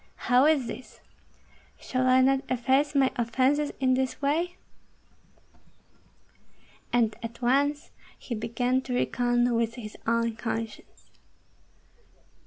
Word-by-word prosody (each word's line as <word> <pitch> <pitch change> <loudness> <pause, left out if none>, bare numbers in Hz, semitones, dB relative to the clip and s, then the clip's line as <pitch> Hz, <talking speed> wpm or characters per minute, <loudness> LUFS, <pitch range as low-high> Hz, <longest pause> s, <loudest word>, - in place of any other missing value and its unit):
"How 250 +3 +6
is 300 -5 +3
this? 255 - -9 0.8
Shall 255 0 -1
I 255 0 +5
not 270 +1 +3
efface 265 +4 +1
my 270 -2 +3
offences 260 +5 +1
in 260 -1 +2
this 260 0 -1
way?" 330 +6 0 2.4
And 230 -3 +2
at 235 +1 -8
once 285 +4 +1 0.3
he 245 - -7
began 245 +3 -1
to 255 -1 -4
reckon 245 0 +1
with 230 0 0
his 215 -4 -8
own 230 -1 0
conscience. 225 -1 -6
255 Hz, 110 wpm, -27 LUFS, 235-270 Hz, 2.4 s, How